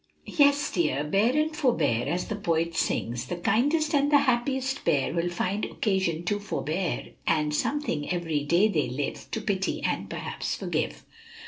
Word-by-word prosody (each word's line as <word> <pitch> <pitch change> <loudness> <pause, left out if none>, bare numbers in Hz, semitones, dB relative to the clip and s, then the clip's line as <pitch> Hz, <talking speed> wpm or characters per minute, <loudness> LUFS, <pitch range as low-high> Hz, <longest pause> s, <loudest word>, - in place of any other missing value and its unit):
"Yes, 285 0 +3
dear; 150 -5 +1
bear 205 - +2
and 310 +1 +1
forbear, 240 - +1
as 180 +1 -1
the 215 - -3
poet 170 -4 0
sings 120 -6 -1
"'The 175 - -3
kindest 290 - +1
and 285 0 +3
the 290 - +8
happiest 265 0 0
pair 140 -1 +1
Will 170 +1 0
find 185 +4 -2
occasion 190 -6 0
to 205 +4 0
forbear, 185 -3 -2 0.2
And 150 -2 +2
something 165 - -1
every 165 -5 -1
day 170 +8 +4
they 150 - 0
live 135 +3 -4
To - - -2
pity 195 -3 -1
and - - -1
perhaps - - -3
forgive.'" - - -3
190 Hz, 160 wpm, -27 LUFS, 160-260 Hz, 0.2 s, the